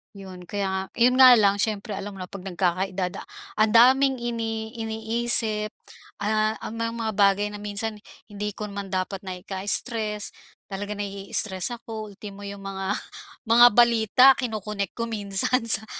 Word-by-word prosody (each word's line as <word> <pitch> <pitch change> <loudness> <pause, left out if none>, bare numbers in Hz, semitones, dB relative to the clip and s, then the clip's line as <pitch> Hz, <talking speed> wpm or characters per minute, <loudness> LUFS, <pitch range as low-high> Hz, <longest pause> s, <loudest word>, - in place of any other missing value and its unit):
'yon. 190 -2 -10
Kaya 200 0 -2
nga 190 0 -1 0.2
'yon 250 +2 +5
nga 255 -1 +10
lang, 200 -3 +4
siyempre 210 0 -2
alam 200 0 -6
mo - - -11
na - - -9
'pag 195 0 -10
nagkaka-edad 185 0 -2 0.4
ang 215 0 +4
daming 260 +3 +5
ini 225 -2 -3
iniisip, 220 -1 0 0.5
ah, 215 +1 +1
ang 225 - -7
mga 230 -1 -2
bagay 200 0 +3
na 210 - -8
minsan 210 +1 -4 0.3
hindi 210 0 -4
ko 210 - -5
naman 200 -1 -6
dapat 190 +1 -2
na 185 - -4
ika-stress 210 +3 -3 0.4
talaga 205 +1 -4
nai-stress 195 -1 -2
ako 220 -2 -7
ultimo 200 0 -10
yung 200 -1 -8
mga 195 +1 -3 0.5
mga 235 +2 +8
balita 235 0 +5
kinokonek 210 -5 -4
ko 230 - -1
minsan 210 +2 -1
sa 220 0 +3
210 Hz, 150 wpm, -25 LUFS, 195-225 Hz, 0.5 s, nga